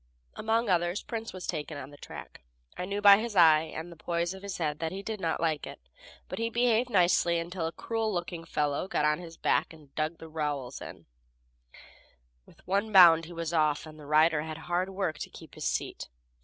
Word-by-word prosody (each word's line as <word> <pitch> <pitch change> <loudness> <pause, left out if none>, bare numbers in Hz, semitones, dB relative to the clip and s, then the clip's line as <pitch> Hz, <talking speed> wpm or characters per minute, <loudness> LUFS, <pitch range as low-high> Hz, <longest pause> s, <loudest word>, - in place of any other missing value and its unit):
Among 225 +2 0
others 175 0 +1
Prince 225 -1 -5
was 185 -1 -7
taken 155 -2 -4
on 140 0 -8
the - - -12
track. - - -10 0.3
I 180 - -4
knew 200 +2 -3
by 200 -1 +9
his 225 -1 -4
eye, 160 -4 +7
and 165 +2 -6
the - - -11
poise 170 +2 -2
of 190 - -10
his 200 -1 -5
head 150 -2 -2
he 195 +3 -6
did 215 -1 -5
not 165 -1 -1
like 160 -3 -1
it, - - -9 0.5
but - - -6
he 230 0 0
behaved 240 +1 +2
nicely 175 -4 +3
until 170 0 -3
a - - -4
cruel 225 +3 -2
looking 175 -2 -4
fellow 150 0 -1
got 150 - 0
on 150 +1 +2
his 165 -2 -10
back - - +1
and 150 -3 -17
dug 155 +2 -2
the 160 - -10
rowels 145 -5 -3
in; - - -10 1.4
with - - -21
one 200 +4 0
bound 170 -4 +8
he 175 - -10
was 165 0 -4
off, 155 -2 +2
and 155 0 -12
the 145 - -11
rider 155 +1 +4
had 155 0 -6
hard 175 +3 -1
work 190 -5 -2
to - - -5
keep - - -13
his - - -6
seat. - - -2
170 Hz, 210 wpm, -29 LUFS, 155-195 Hz, 1.4 s, by